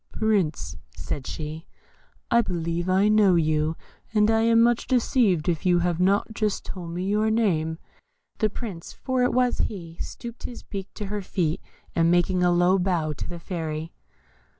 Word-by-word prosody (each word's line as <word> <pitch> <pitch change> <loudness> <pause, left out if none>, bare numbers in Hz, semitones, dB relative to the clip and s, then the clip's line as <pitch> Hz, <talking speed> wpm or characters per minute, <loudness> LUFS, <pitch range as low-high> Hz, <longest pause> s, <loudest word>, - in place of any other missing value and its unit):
"Prince," 160 - 0 0.2
said 135 - -4
she, 155 +1 -6 0.6
"I 235 0 +6
believe 170 -3 -2
I 190 +3 +4
know 210 -3 +5
you, 155 -1 +1 0.4
and 210 +1 +4
I 225 0 +3
am 230 0 +4
much 235 0 +3
deceived 235 - +2
if 170 -3 0
you 180 -1 +4
have 175 -1 0
not 200 +4 +2
just 215 -2 -1
told 175 -3 -7
me 175 +2 -3
your 210 +2 +2
name." 170 -8 +1 0.6
The 215 - +2
Prince 200 -6 -7
(for 260 -1 -1
it 250 - +3
was 250 -1 +1
he) 170 -5 -4
stooped 235 -1 -8
his 245 - -7
beak 195 -1 -7
to 210 - -4
her 205 +1 -3
feet, 170 -4 -1 0.3
as 165 - +3
making 175 +2 +3
a 180 - +4
low 175 +2 +4
bow 175 -4 0
to - - -6
the 175 - -6
Fairy. 160 -2 -5
185 Hz, 175 wpm, -25 LUFS, 165-215 Hz, 0.6 s, I